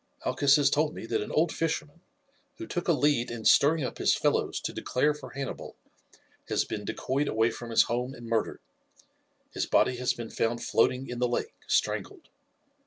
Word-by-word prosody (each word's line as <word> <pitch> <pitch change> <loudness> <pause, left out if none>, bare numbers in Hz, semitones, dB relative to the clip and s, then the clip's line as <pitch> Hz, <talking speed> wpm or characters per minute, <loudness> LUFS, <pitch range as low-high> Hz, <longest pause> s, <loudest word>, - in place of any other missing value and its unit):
Malchus 135 +2 +4
has 145 -2 +3
told 155 +1 +1
me - - -7
that - - -1
an - - -5
old 160 +2 +2
fisherman, 165 0 -3 0.6
who 335 - -6
took 175 - -4
a - - +5
lead 145 -5 +2
in 115 -2 -6
stirring 150 +2 +5
up 125 - -5
his - - +3
fellows - - 0
to - - -5
declare 145 +4 +1
for 150 - -10
Hannibal, 135 -1 -6 0.7
has - - +1
been 105 - -5
decoyed 140 +7 -1
away 110 -1 +2
from 120 - -8
his 115 - +5
home 125 +3 -3
and 120 - -11
murdered; 115 -1 -1 0.9
his - - -2
body 125 - +3
has 125 0 0
been 115 -1 -7
found 120 +1 -1
floating 130 +3 +1
in 120 0 -5
the 125 - +2
lake, 275 - -2
strangled. 390 -5 -1
130 Hz, 185 wpm, -28 LUFS, 120-150 Hz, 0.9 s, a